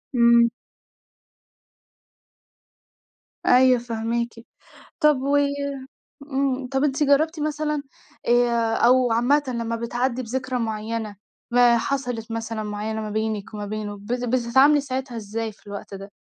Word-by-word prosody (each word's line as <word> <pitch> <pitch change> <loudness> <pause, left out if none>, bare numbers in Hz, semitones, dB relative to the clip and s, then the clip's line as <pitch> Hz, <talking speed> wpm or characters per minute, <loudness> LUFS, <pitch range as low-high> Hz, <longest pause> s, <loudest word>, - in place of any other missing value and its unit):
إمم. 235 -1 +6 3.0
أيوه 255 0 +5
فاهماكِ، 235 0 -2 0.7
طب 300 -1 +5
و 275 +2 0 1.0
امم، 265 -1 0
طب 270 +1 0
أنتِ 290 0 +1
جربتِ 310 +3 +2
مثلًا 300 -1 -2 0.4
آآ، 235 -2 +2
أو 250 0 +4
عامةً 250 +6 +3
لما 230 -2 -2
بتعدّي 240 +2 -2
بذكرى 255 +2 -3
معيّنة 220 -1 -3 0.4
ما 240 -1 +5
حصلت 245 -2 -3
مثلًا 225 -1 -4
معيّنة 210 +1 -4
ما 215 - -5
بينِك 220 0 -3
وما 210 -1 -5
بينه 205 0 -5
بت 240 +5 -4
بتتعاملي 255 +4 +4
ساعتها 260 -2 -4
إزاي 220 +1 -4
في 210 - -23
الوقت 200 0 -8
ده؟ 195 +1 -9
235 Hz, 120 wpm, -23 LUFS, 220-260 Hz, 3.0 s, إمم